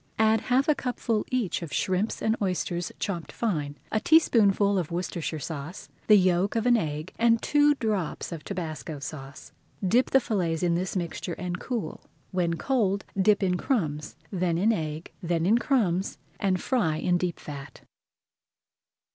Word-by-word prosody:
Add 220 0 +4
half 260 +3 +2
a 305 - +5
cupful 245 -5 -2
each 245 -10 -1
of 165 -4 -6
shrimps 185 - -1
and 220 0 +2
oysters 180 -2 -1
chopped 175 -5 -3
fine, 150 -10 -2
a 215 - +2
teaspoonful 205 - +4
of 170 - -3
Worcestershire 170 -2 -3
sauce, 155 +4 -6 0.2
the 215 - +8
yolk 185 +2 +2
of 225 0 0
an 245 -1 +5
egg, 155 -4 -2
and 230 0 +4
two 295 +2 +4
drops 210 - -2
of 165 -3 -6
tabasco 160 -5 -5
sauce. 140 -1 -8 0.4
Dip 240 +7 +3
the 270 - +5
fillets 180 -9 -1
in 175 -1 +2
this 180 +3 -2
mixture 175 -1 -3
[Page 180 +1 -4
148] - - -2
and 180 - -5 0.2
cool. 155 - -8 0.3
When 175 -2 0
cold 200 -1 0 0.2
dip 205 +1 +4
in 180 -1 +2
crumbs, 155 - -1 0.2
then 180 -3 0
in 215 +6 +3
egg, 155 -3 -4
then 170 -1 0
in 220 +5 +4
crumbs, 200 -9 +1 0.2
and 190 -2 +1
fry 210 - +1
in 175 +2 +1
deep 175 -2 -2
fat. 140 -2 -9
185 Hz, 165 wpm, -27 LUFS, 165-220 Hz, 0.4 s, the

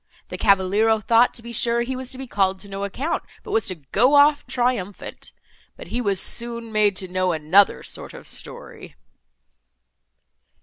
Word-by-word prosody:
The - - -6
cavaliero 205 +2 +3
thought, 230 +3 +3
to 235 - -5
be 235 0 -8
sure, 235 +1 +1
he 260 +2 -4
was 255 -1 -5
to 265 - -8
be 265 - -6
called 195 -5 0
to 205 - -11
no 195 0 -6
account, 260 - -3 0.2
but - - -9
was 225 - +1
to 185 - -4
go 200 - +1
off 290 +1 +4
triumphant; 240 -6 -3 0.5
but - - -11
he 240 +5 -2
was 200 -5 0
soon 235 0 0
made 210 -2 +2
to 185 0 -5
know 185 0 0
another 160 +6 +3
sort - - -7
of - - -12
story." - - -6
220 Hz, 175 wpm, -22 LUFS, 195-240 Hz, 0.5 s, off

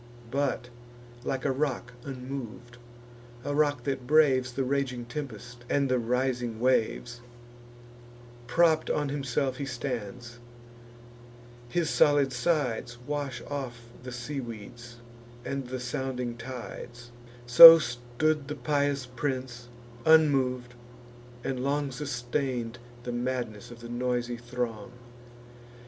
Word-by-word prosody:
But, 135 -3 -1 0.5
like 130 0 -3
a 140 - +2
rock 130 -3 -2
unmov'd, 125 -3 -7 0.7
a 145 - -1
rock 145 -4 +1
that 135 -2 -3
braves 135 -4 +4
The 135 +2 -1
raging 130 -2 -1
tempest 120 -2 -7
and 140 -1 +1
the 130 -1 +2
rising 125 -1 -1
waves, 120 -1 0 1.3
Propp'd 160 +4 +3
on 145 -1 0
himself 135 -1 -1
he 140 - -3
stands; 120 -2 -5 1.3
his 170 +3 0
solid 145 -3 +4
sides 125 -4 -1
Wash 145 -2 -3
off 135 -4 -5 0.2
the 125 0 -8
seaweeds, 120 -2 -7 0.5
and 135 -2 -3
the 130 +1 -4
sounding 125 -1 -3
tides: 120 -1 -8 0.3
So 165 +8 +12
stood 135 +3 -1
the 150 - -4
pious 140 0 0
prince, 125 -1 -4 0.4
unmov'd, 135 -6 +3 0.7
and 130 -1 -2
long 140 0 0
Sustain'd 125 -3 -3 0.2
the 120 - -4
madness 120 -3 -3
of 120 -1 -12
the 120 - -9
noisy 120 0 -1
throng. 120 -1 -5
125 Hz, 110 wpm, -28 LUFS, 120-140 Hz, 1.3 s, So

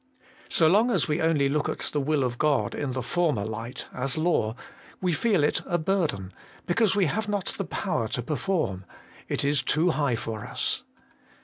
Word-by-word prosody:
So 165 - +3
long 210 +9 +4
as 240 - +2
we 150 +1 0
only 160 -4 +3
look 145 +2 0
at - - -2 0.2
the 145 - +1
will 145 0 +1
of 120 -1 -2
God 150 -3 +2
in 140 -3 -3
the 130 -1 -2
former 150 -8 +1
light, 115 +3 -5
as 125 +2 -2
law, 155 -9 +1 0.4
we 180 -2 +1
feel 195 0 +2
it 150 - +2
a 175 - +1
burden, 155 - -1 0.3
because 200 +3 +2
we 200 -2 +3
have 210 +8 -1
not 205 -2 -1
the 195 - -1
power 130 - -1
to 120 +2 -3
perform 150 - -1 0.5
it - - 0
is 140 -1 +2
too 155 +7 +2
high 145 -6 +1
for 110 -1 -4
us. - - -1
150 Hz, 190 wpm, -27 LUFS, 125-175 Hz, 0.5 s, long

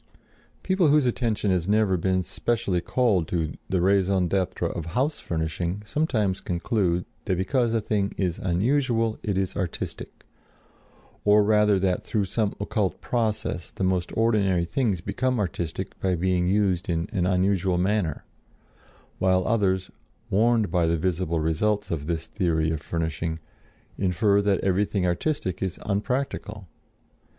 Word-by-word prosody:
People 190 -3 +2
whose 150 -1 +4
attention 115 -4 0
has 90 -2 0
never 105 -2 +3
been 95 +1 +1
specially 95 -4 -1
called 100 -7 +1
to 80 -4 -1 0.2
the 95 -2 +1
raison 95 -1 +3
d'être 95 +1 -1
of 85 -1 -5
house 145 +4 +1
furnishing 85 +4 -3
sometimes 110 -8 0
conclude 90 0 0 0.2
that 90 - 0
because 120 +5 +1
a 115 - +1
thing 100 -2 0
is 90 -3 -1
unusual 115 +4 +1
it 100 -3 -1
is 95 -1 -1
artistic, 95 -4 -5 1.0
or 105 0 +5
rather 105 -1 +4
that 95 -1 0
through 105 -3 0
some 105 +1 -1
occult 100 -1 -1
process 110 -7 -2
the - - -5
most 95 -1 0
ordinary 100 -6 +2
things 105 -3 0
become 130 +5 -1
artistic 90 -1 -3
by 95 -1 +1
being 90 0 +1
used 95 -3 +1
in 85 -1 0
an 90 -2 0
unusual 95 -1 +2
manner; 90 -4 0 0.9
while 95 0 +2
others, 95 -4 +1 0.4
warned 110 +1 +3
by 85 -3 +2
the 85 0 +1
visible 85 -1 -1
results 100 +7 0
of 75 -3 -3
this 80 -1 -2
theory 80 -4 0
of 80 -2 -3
furnishing, 80 0 -2 0.6
infer 100 +2 +2
that 100 -1 +2
everything 95 0 +1
artistic 90 - -1
is 95 -2 -3
unpractical. 105 -1 -2
95 Hz, 140 wpm, -25 LUFS, 90-105 Hz, 1.0 s, or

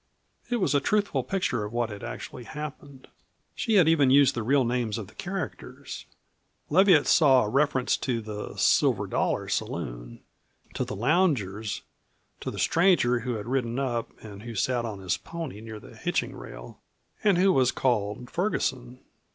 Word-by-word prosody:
It 245 - +1
was 185 - +1
a 145 - +4
truthful 205 +8 +1
picture 180 - -1
of 105 - -5
what 120 -1 -1
had 100 - -8
actually 125 - -7
happened. 145 -1 -8 0.5
She 225 -3 0
had 180 -5 +6
even 155 -5 +4
used 140 0 +6
the 120 - -3
real 130 +3 +3
names 120 -3 -1
of 110 - -5
the - - -17
characters. 185 -5 -6 0.7
Leviatt 180 -2 +6
saw 135 -6 +5
a 105 - -2
reference 135 0 +2
to 125 -3 -1
the 105 -1 -6
"Silver - - +3
Dollar" - - -1
saloon, - - -4 0.5
to - - -1
the - - -5
loungers, 110 - 0 0.6
to - - -4
the - - -7
stranger 165 -9 +3
who 125 0 -3
had 105 - -5
ridden 120 -1 -1
up 120 -4 -1
and 105 -2 -9
who 115 0 -8
sat 120 +3 0
on 105 -4 -6
his 95 -1 0
pony 160 -11 -7
near 110 -1 -8
the - - -14
hitching - - -2
rail, - - -10 0.4
and 200 -4 +4
who 190 +1 +4
was 130 -4 +3
called 120 -1 -1
Ferguson. 130 - -2
125 Hz, 165 wpm, -27 LUFS, 110-150 Hz, 0.7 s, had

